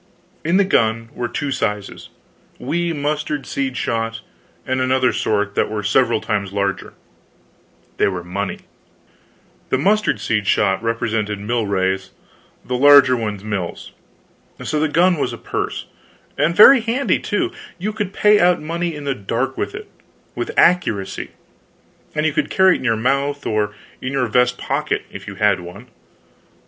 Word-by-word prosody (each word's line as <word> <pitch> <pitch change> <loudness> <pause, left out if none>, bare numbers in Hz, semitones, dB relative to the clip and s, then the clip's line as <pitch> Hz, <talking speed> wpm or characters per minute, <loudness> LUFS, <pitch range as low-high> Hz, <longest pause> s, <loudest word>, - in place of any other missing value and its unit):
In 170 +4 +2
the 200 - +5
gun 115 - +1
were 120 - -3
two 140 +4 -3
sizes 105 -5 -3 0.5
wee 170 0 -1
mustard 150 -1 -2
seed 135 -2 -3
shot, 115 0 -2 0.4
and 130 0 -1
another 130 0 +2
sort 105 -1 0
that - - 0
were 105 -1 -3
several 115 +3 +2
times 100 -3 -2
larger. 100 -1 -2 1.0
They - - +3
were 90 -3 -3
money. 95 +3 -4 1.1
The - - +2
mustard 205 +9 +2
seed 105 -3 -1
shot 95 0 +2
represented 115 -2 -1
milrays, 100 -4 -1 0.6
the 125 - -2
larger 140 -1 +7
ones 105 -4 -4
mills. 100 -5 -4 0.7
So 150 - -1
the 155 - +2
gun 175 +3 +3
was - - -1
a - - -6
purse; - - -4 0.5
and 170 +2 +1
very 255 +5 +9
handy, 240 +5 0
too; - - -1 0.3
you 210 +4 -3
could 210 -3 -3
pay 210 +1 +4
out 180 -1 +4
money 170 +1 -3
in 150 - -7
the 140 -1 -1
dark 130 +4 -2
with 400 - -3
it, 425 +1 -8 0.5
with - - -4
accuracy; 110 - +2 0.9
and 150 0 0
you 155 - +1
could - - 0
carry 190 -1 +5
it - - -2
in - - -8
your 115 -3 +1
mouth; 140 +4 0
or 105 -1 -1 0.3
in 130 +1 -4
your 135 -2 +1
vest 125 +2 +2
pocket, - - -2
if - - -9
you 100 - -7
had 105 -2 +2
one. 90 +8 -11
125 Hz, 155 wpm, -20 LUFS, 105-155 Hz, 1.1 s, very